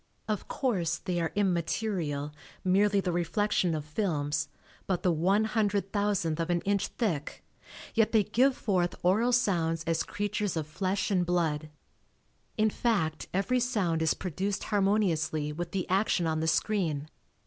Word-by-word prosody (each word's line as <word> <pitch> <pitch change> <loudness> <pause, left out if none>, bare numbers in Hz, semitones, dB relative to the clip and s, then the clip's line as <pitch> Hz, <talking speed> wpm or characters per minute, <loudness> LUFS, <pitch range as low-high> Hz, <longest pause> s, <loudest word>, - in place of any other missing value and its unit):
Of 215 -3 -2
course, 180 - 0
they 180 -1 -2
are 165 - -1
immaterial, 170 -5 -1 0.3
merely 200 +2 +3
the 185 - -1
reflection 175 0 +1
of 150 -1 -4
films, 150 -4 -1 0.4
but 185 -3 -1
the 180 - +3
one 185 +6 +2
hundred 205 -3 0
thousandth 200 -6 0
of 165 +1 -1
an 175 -1 +1
inch 200 0 0
thick, 170 - -3 0.5
yet 225 -1 +3
they 220 -2 +4
give 255 +6 +2
forth 180 -4 0
oral 215 +7 +3
sounds 170 -9 +1
as 165 0 +1
creatures 205 -3 -2
of 155 - -1
flesh 190 +6 -1
and 185 -2 +3
blood. 160 -4 0 0.9
In 215 0 +3
fact 185 -11 0
every 200 +7 +1
sound 205 -10 0
is 160 - +2
produced 190 +3 -3
harmoniously 175 -8 +1
with 170 +2 -4
the 185 0 -3
action 190 -2 +2
on 160 -1 0
the 160 - -1
screen. 160 -5 0
185 Hz, 150 wpm, -29 LUFS, 160-205 Hz, 0.9 s, they